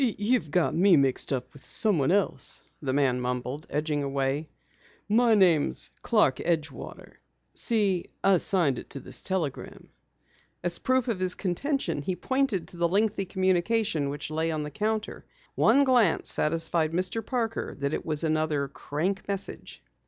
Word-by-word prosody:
"You've 220 - 0
got 175 +3 +1
me 180 0 +5
mixed 135 0 +1
up 130 -1 -3
with 145 - -15
someone 170 -11 +1
else," 200 0 -1 0.2
the 135 -3 -1
man 130 -2 +1
mumbled, 125 +4 -4
edging 150 -1 -1
away. 140 +2 -2 0.6
"My 230 +2 +4
name's 175 -7 +2
Clark 210 - +2
Edgewater. 160 -3 -4 0.4
See, 200 -6 +1 0.2
I 195 -1 +5
signed 170 -8 +1
it - - -12
to 140 - -5
this - - -5
telegram." 175 -8 -3 0.7
As 175 -1 0
proof 260 -1 +1
of 225 -6 -1
his 185 -1 -1
contention, 190 - -2
he 180 +5 -2
pointed 260 -1 -1
to 175 - -10
the 170 0 +2
lengthy 200 +1 +1
communication 185 -3 +1
which 145 +2 -5
lay 160 +1 -1
on 155 -2 -2
the 150 - -6
counter. 215 +2 -2 0.3
One 280 - +4
glance 245 -10 +3
satisfied 165 0 +2
Mr. 185 +6 -1
Parker 230 -3 -3
that 140 +1 -2
it - - -2
was 155 -1 0
another 155 -3 0
"crank" 170 +8 -3
message. 200 -1 -5
175 Hz, 150 wpm, -27 LUFS, 150-210 Hz, 0.7 s, me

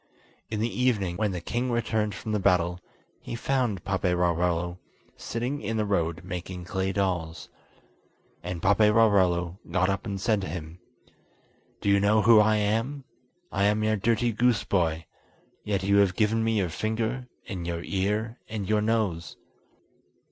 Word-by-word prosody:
In 110 - -3
the 115 +3 -1
evening, 100 -8 +1
when 110 -1 +1
the 90 - -3
king 120 +8 -2
returned 110 -3 0
from 110 - -5
the 105 - +1
battle, 90 -2 +2 0.4
he - - -6
found 120 -6 -1
Paperarello 90 -2 0 0.4
sitting 125 +5 -3
in 115 - -2
the 105 - +1
road 85 -3 -1
making 90 -1 -6
clay 95 +1 -1
dolls. 90 -4 -2 0.9
And 85 -1 -5
Paperarello 100 -4 +3
got 95 0 +1
up 100 +3 -2
and 100 -1 -3
said 105 +1 +1
to - - -4
him: 80 +1 -7 1.0
"Do - - 0
you 100 0 +5
know 105 +2 +3
who 115 -1 +7
I 110 0 +4
am? 115 +7 -1 0.5
I 100 +1 +1
am 105 +1 +2
your 110 0 +2
dirty 115 +3 +1
goose 115 0 +2
boy, 80 -4 0 0.6
yet 100 -3 -1
you 100 +1 +3
have 100 -3 +4
given 110 +1 +2
me 115 -1 +1
your 95 -4 0
finger, 110 +7 -2 0.2
and 90 -6 -5
your 85 0 -3
ear, 105 +4 -1
and 105 -3 -4
your 105 0 +2
nose." 105 -7 -1
100 Hz, 155 wpm, -27 LUFS, 90-110 Hz, 1.0 s, who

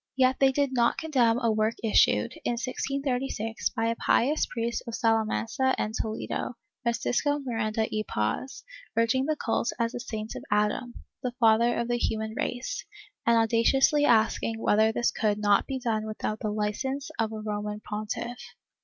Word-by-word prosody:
^ - - -63
Yet 260 0 +4
they 270 -1 +5
did 280 0 0
not 235 -2 +2
condemn 250 -8 +2
a 230 - +3
work 220 +1 +1
issued, 155 - +3
in - - 0
1636, 255 -2 -2
by 225 -2 -2
a 230 0 +1
pious 290 +6 +2
priest 235 0 -2
of 230 - -4
Salamanca 225 +3 +1
and 215 - -2
Toledo, 220 +2 -3 0.3
Francisco 245 +4 0
Miranda 225 -5 -1
y 215 - 0
Paz, 105 - -2 0.3
urging 230 +4 +2
the 310 - +1
cult 235 -3 -1
as 230 0 0
a 245 - -4
saint 220 -2 -5
of - - -7
Adam, 210 +4 0 0.3
the 250 -1 -3
father 230 +1 +4
of 235 - -1
the 240 0 0
human 220 -1 -1
race, 245 - -3 0.4
and 235 0 +5
audaciously 235 +6 +3
asking 225 -2 +2
whether 220 0 +3
this 235 +1 +1
could 210 -2 0
not 205 -1 +3
be 270 - -2
done 220 -4 -1
without 215 0 -3
the 215 - -2
licence 265 +8 -2
of 225 -1 +1
the 220 0 -6
Roman 210 0 -3
pontiff. 215 +3 -5
230 Hz, 170 wpm, -27 LUFS, 220-255 Hz, 0.4 s, they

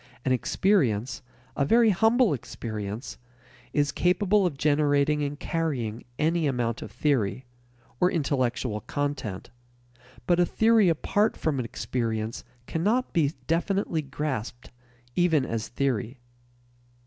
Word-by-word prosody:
An 130 - +2
experience, 130 - +1 0.3
a 140 - +1
very 225 +9 +5
humble 225 - +3
experience, 110 -3 -6 0.5
is 145 -1 +1
capable 190 +2 +2
of 150 -6 -5
generating 145 0 +2
and 145 0 -3
carrying 130 -9 -2
any 160 0 +1
amount 120 -4 -1
of - - -8
theory 130 -4 0 0.5
(or 180 - +4
intellectual 130 - -1
content), 140 -11 -4 0.7
but 175 -1 +3
a - - +6
theory 220 -4 +4
apart 205 +6 +1
from 150 -4 -1
an 125 - -2
experience 115 -1 -3 0.2
cannot 215 - 0
be 155 -3 +2
definitely 170 0 0
grasped 135 -5 -5 0.4
even 165 -6 +3
as 115 -3 -3
theory. 125 -1 -2
145 Hz, 115 wpm, -26 LUFS, 120-175 Hz, 0.7 s, a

